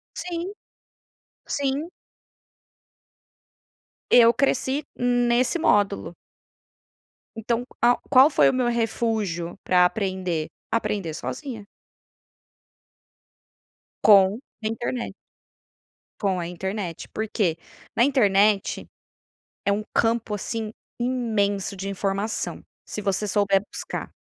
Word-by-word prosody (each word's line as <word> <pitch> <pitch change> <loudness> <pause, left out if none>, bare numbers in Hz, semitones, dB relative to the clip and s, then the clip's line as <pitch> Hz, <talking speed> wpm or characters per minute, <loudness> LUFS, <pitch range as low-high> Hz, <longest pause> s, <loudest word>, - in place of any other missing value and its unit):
Sim, 355 +2 -4 0.9
sim. 285 +4 -1 2.2
Eu 235 -1 +7
cresci 275 +2 0
nesse 245 +4 +2
módulo. 205 - +1 1.2
Então 230 +2 -1 0.2
qual 240 +1 +4
qual 270 +2 +7
foi - - +5
o - - +3
meu 255 -1 +1
refúgio 220 -7 -1
para 180 -1 +5
aprender? 185 -5 -1 0.3
Aprender 205 -7 -1
sozinha. 235 - -6 2.4
Com 195 0 +7
a 240 -4 -11
internet. 240 +1 -4 1.1
Com 195 -3 +1
a 170 - -3
internet, 180 0 -4
por 220 - -2
quê? 185 -7 0 0.4
Na 235 - +5
internet, 205 -6 +2 0.8
é 200 - +3
um 205 +1 0
campo 225 -2 +1
assim 220 +1 -4 0.3
imenso 220 -6 0
de 195 +1 -5
informação, 195 +2 -2 0.2
se 210 - -5
você 200 +1 0
souber 200 -1 +2
buscar. - - -6
215 Hz, 95 wpm, -24 LUFS, 195-245 Hz, 2.4 s, Eu